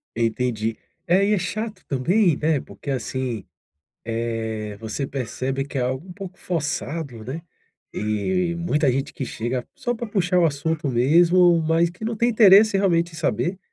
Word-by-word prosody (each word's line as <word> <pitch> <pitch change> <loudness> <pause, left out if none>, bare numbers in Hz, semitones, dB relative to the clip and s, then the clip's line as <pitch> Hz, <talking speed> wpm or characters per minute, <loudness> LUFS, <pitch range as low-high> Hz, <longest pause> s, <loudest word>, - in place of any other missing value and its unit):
Entendi, 115 -1 -1 0.3
é 185 +3 +4
e 210 - +2
é - - +3
chato 215 +5 -4
também, 170 +6 +2
né, 155 -1 +1
porque, 140 - -10
assim, 130 -4 -3 0.6
eh, 115 -2 -3
você 110 +5 -3
percebe 135 +1 -3
que 140 - -6
é - - +1
algo 130 +7 -2
um 180 - -9
pouco 190 0 -9
forçado, 150 -6 -3
né. 135 +8 -5 0.5
E 170 - -1
muita 155 -5 +1
gente 135 +2 -2
que 135 - -4
chega 120 +2 -3
só 245 - -2
pra 235 - -5
puxar 185 -3 +1
o 170 - +4
assunto 155 +1 -1
mesmo, 170 +8 +5
mas 165 +1 +3
que 175 +6 -8
não 230 0 -2
tem 235 +3 +2
interesse 215 -2 +6
realmente 175 -3 +2
em - - -9
saber, 155 - -1
155 Hz, 165 wpm, -23 LUFS, 125-180 Hz, 0.6 s, interesse